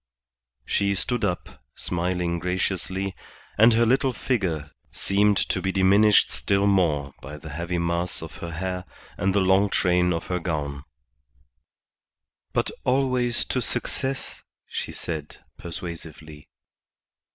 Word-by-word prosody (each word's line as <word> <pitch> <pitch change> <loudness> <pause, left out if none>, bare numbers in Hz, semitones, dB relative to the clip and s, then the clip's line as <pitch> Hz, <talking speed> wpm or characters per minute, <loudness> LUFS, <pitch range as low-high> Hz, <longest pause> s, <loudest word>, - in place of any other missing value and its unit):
She 100 0 +1
stood 120 +4 0
up, 90 -4 -3
smiling 90 -1 -1
graciously, 95 +1 -1 0.4
and 115 +2 +7
her 115 +1 +4
little 130 +2 +3
figure 85 - -1 0.2
seemed 100 +1 +2
to - - 0
be 95 - 0
diminished 100 +2 +5
still 100 0 +1
more 80 -8 +2
by 75 +3 -8
the 75 +1 -10
heavy 85 +4 -2
mass 85 0 -1
of 80 - -9
her 85 - -6
hair 90 +2 -3 0.3
and 95 +2 0
the 100 - +4
long 95 +2 +4
train 90 -2 +2
of 85 -1 -2
her 90 0 -1
gown. 70 -5 -3 1.7
"But - - 0
always 125 -2 +2
to 125 - -1
success," 130 +3 -3 0.3
she - - -4
said, 75 -3 -6 0.2
persuasively. 80 -3 -7
90 Hz, 125 wpm, -25 LUFS, 85-100 Hz, 1.7 s, and